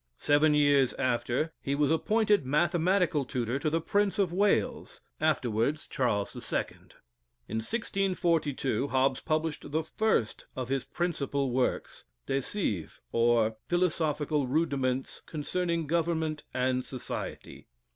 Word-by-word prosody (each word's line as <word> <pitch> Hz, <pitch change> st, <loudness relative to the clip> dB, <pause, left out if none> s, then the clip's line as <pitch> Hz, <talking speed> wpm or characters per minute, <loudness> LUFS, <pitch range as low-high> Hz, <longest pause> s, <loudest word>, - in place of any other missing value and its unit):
Seven 150 Hz, +1 st, +3 dB
years 145 Hz, -3 st, +4 dB
after, 130 Hz, +4 st, 0 dB
he 140 Hz, -, -1 dB
was 145 Hz, +1 st, +2 dB
appointed 210 Hz, +4 st, +2 dB
mathematical 170 Hz, +2 st, +2 dB
tutor 125 Hz, 0 st, -2 dB
to 155 Hz, -, 0 dB
the 165 Hz, +2 st, +1 dB
Prince 205 Hz, +4 st, +1 dB
of 190 Hz, -4 st, +1 dB
Wales, 210 Hz, +5 st, +1 dB, 0.2 s
afterwards 140 Hz, -2 st, 0 dB
Charles 105 Hz, -7 st, -1 dB
II. -, -, -1 dB, 0.8 s
In 110 Hz, -, -3 dB
1642, 170 Hz, -, 0 dB
Hobbes 130 Hz, 0 st, +2 dB
published 155 Hz, -1 st, -2 dB
the 160 Hz, +2 st, 0 dB
first 160 Hz, -, 0 dB
of 130 Hz, -1 st, -4 dB
his 135 Hz, 0 st, -1 dB
principal 140 Hz, -6 st, -1 dB
works, 125 Hz, +1 st, -1 dB, 0.2 s
"De 135 Hz, 0 st, 0 dB
Cive, 110 Hz, -, -3 dB
or 115 Hz, -1 st, +3 dB
Philosophical 155 Hz, -5 st, +1 dB
Rudiments 135 Hz, -3 st, -1 dB
Concerning 170 Hz, +2 st, -1 dB
Government 160 Hz, -1 st, -1 dB
and 130 Hz, 0 st, 0 dB
Society." 130 Hz, -1 st, -7 dB
150 Hz, 115 wpm, -29 LUFS, 130-170 Hz, 0.8 s, years